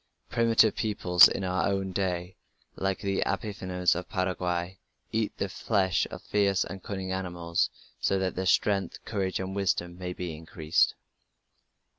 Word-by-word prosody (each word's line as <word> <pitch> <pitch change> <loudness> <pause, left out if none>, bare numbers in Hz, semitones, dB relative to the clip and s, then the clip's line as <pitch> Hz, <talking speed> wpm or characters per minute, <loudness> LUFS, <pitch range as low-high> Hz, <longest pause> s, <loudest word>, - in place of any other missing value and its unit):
Primitive 115 -2 +4
peoples 90 -5 +6
in 100 - -3
our 95 0 0
own 95 -1 -1
day, 90 -1 -2 0.4
like 95 0 -1
the 100 -1 0
Abipones 95 -5 0
of 90 +1 -5
Paraguay, 90 -1 -2 0.3
eat 110 -1 -1
the 100 - -1
flesh 95 -1 +1
of - - -9
fierce 100 -2 +2
and 95 -1 -7
cunning 95 -1 -4
animals 90 -3 -1 0.3
so 95 - +1
that 95 -1 -1
their 95 0 -2
strength, 100 0 +1
courage, 95 -4 -1
and 95 +1 -4
wisdom 90 -3 -1
may 90 -1 -4
be 90 -3 -5
increased. 80 0 +1
95 Hz, 145 wpm, -28 LUFS, 90-100 Hz, 0.4 s, peoples